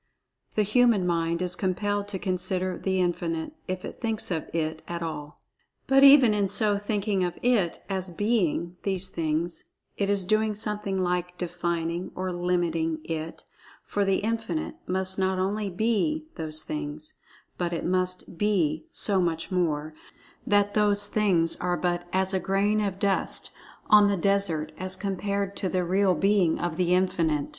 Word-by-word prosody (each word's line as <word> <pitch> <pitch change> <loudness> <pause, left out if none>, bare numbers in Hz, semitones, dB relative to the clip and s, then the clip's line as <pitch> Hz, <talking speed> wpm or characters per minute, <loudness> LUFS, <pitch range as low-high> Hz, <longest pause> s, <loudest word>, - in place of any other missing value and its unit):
The 215 - +3
human 215 -2 +3
mind 170 0 0
is 180 -1 -1
compelled 205 +3 -1
to 205 -2 -4
so 190 - -12
consider 185 -1 -1
The 190 -1 -1
Infinite, 170 - -1
if 185 -1 -3
it - - -9
thinks 225 -4 -2
of 160 -3 -2
It 160 -1 -2
at 170 0 -4
all. 150 -2 -6 0.5
But 270 0 +5
even 275 -5 +8
in 200 -2 +1
so 205 0 +2
thinking 205 -2 0
of 175 -1 -2
It 225 -9 +1
as 190 -2 -2
"being" 180 -3 0
these 190 -1 -1
things, 165 0 -1 0.3
it 200 -1 0
is 200 -2 +2
doing 215 +1 +1
something 205 -2 -2
like 180 0 -1
"defining" 170 0 -2
or 185 0 -2
"limiting" 170 -2 0
It, 160 0 -5 0.4
for 205 - -1
The 195 -1 +2
Infinite 230 +8 -2
must 190 +1 -1
not 190 0 +1
only 200 +2 -1
"be" 235 - 0
those 155 -1 -5
things, 150 0 -5 0.4
but 175 -1 -1
it 170 - -3
must 185 -1 -1
"be" 205 - +1
so 200 - +3
much 165 +1 -2
more, 155 -4 0 0.5
that 205 0 +3
"those 205 -1 +2
things" 195 -6 +2
are 180 0 -1
but 175 -1 -1
as 190 +1 +1
a 190 - +2
grain 200 +3 +1
of 195 -2 -2
dust 195 -1 0 0.4
on 210 -1 +7
the 200 -1 +1
desert 175 -5 0
as 185 +1 -2
compared 200 0 -2
to 190 - -1
the 185 0 0
real 190 +1 +3
"Being" 195 -3 +3
of 175 -2 -3
The 180 -1 +3
Infinite. 170 -6 +1
185 Hz, 165 wpm, -27 LUFS, 170-205 Hz, 0.5 s, even